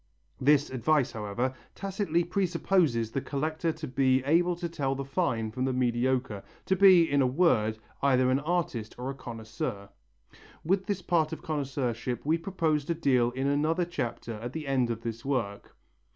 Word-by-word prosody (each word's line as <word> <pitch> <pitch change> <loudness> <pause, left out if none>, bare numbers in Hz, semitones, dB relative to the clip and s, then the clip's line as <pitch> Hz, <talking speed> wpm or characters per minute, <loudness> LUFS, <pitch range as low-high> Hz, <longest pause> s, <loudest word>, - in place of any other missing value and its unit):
This 145 +1 +3
advice, 135 +2 +1
however, 115 +4 -2 0.2
tacitly 195 -4 -1
presupposes 170 - +1
the 135 - -2
collector 155 +4 -2
to 155 -1 -7
be 130 0 +2
able 170 +5 +3
to 170 0 -4
tell 140 -5 -2
the 135 0 -4
fine 130 -7 -1
from 130 +3 -3
the 130 - 0
mediocre, 125 -3 0 0.2
to 190 - +2
be, 185 -2 +7
in 140 -2 +2
a 130 - +3
word, 125 -7 +2 0.2
either 130 -2 +3
an 130 - +2
artist 150 -8 -2
or 125 +2 -3
a - - -6
connoisseur. 110 -4 -6 0.8
With 190 +3 +1
this 195 -3 -2
part 165 -3 +1
of - - -7
connoisseurship 130 -5 -2
we 160 +3 +2
propose 165 -4 0
to 170 - -1
deal 130 -6 +2
in 130 +2 -3
another 155 +5 +1
chapter 120 -8 -4
at 120 +3 -6
the 160 -2 -5
end 130 -3 +1
of 115 -1 -3
this 115 0 -5
work. 120 -8 -3
135 Hz, 170 wpm, -28 LUFS, 120-165 Hz, 0.8 s, be